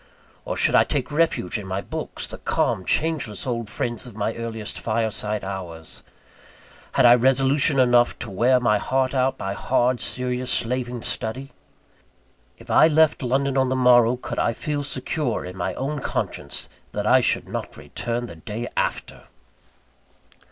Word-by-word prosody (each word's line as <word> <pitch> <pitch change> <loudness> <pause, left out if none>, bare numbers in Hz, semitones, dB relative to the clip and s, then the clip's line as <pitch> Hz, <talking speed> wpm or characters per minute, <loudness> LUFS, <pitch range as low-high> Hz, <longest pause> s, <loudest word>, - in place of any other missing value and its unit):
Or - - -3
should - - +3
I - - +6
take 140 -1 -2
refuge 145 - +1
in 100 - -8
my 95 +1 -2
books - - -5
the - - -8
calm, 95 - 0
changeless 150 - 0
old 115 -4 -3
friends 120 +2 -4
of 115 - -12
my 110 +1 -1
earliest 115 -2 -5
fireside 110 -2 -1
hours? 90 -5 -7 0.9
Had 130 - +4
I 120 - +9
resolution 135 +3 +3
enough 120 -1 +4
to 115 - -6
wear 125 +6 +3
my 105 -4 +2
heart 130 +2 0
out 130 0 +1
by 95 0 -3
hard, 125 +3 +1
serious, 125 0 -2
slaving 125 -1 0
study? 130 +5 -3 1.1
If - - -10
I 155 - +7
left 160 -1 +3
London 135 +2 0
on 130 -1 +2
the 130 - 0
morrow, 125 -2 +5
could 125 - -5
I 115 - +1
feel 145 +5 -3
secure, 140 -2 -2
in 90 0 -8
my 95 0 -3
own 145 +3 -3
conscience, - - -3 0.3
that - - -2
I - - +5
should - - 0
not - - -6
return 120 +1 -3
the 85 -8 -10
day 110 +8 -5
after! - - -3
120 Hz, 160 wpm, -23 LUFS, 110-130 Hz, 1.1 s, I